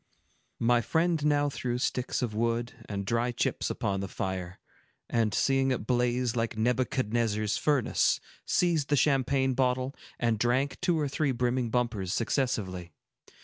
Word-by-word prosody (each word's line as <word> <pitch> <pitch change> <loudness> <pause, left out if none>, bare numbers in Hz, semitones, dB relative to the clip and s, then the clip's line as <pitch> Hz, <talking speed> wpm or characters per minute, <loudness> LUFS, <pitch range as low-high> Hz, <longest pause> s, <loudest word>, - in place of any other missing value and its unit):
My 120 +1 +3
friend 160 +5 +1
now 145 -1 +3
threw 125 -3 -2
sticks 125 0 -1
of 115 -3 -2
wood 115 +2 -1 0.2
and 100 -1 -3
dry 115 +3 0
chips 120 - -1
upon 100 -1 -1
the 100 - -3
fire, 95 -1 -4 0.5
and 115 -2 +1
seeing 135 +5 +2
it 125 -5 -1
blaze 125 0 +1
like 115 -2 -1
Nebuchadnezzar's 115 -3 0
furnace, 145 -6 +2 0.2
seized 165 -5 +1
the 145 - +4
champagne 135 -1 +2
bottle, 130 +1 0 0.2
and 115 -3 0
drank 130 +4 +1
two 175 -3 +2
or 150 - 0
three 140 +1 0
brimming 125 0 0
bumpers, 110 -6 -1
successively. 100 - -1
120 Hz, 145 wpm, -29 LUFS, 110-135 Hz, 0.5 s, the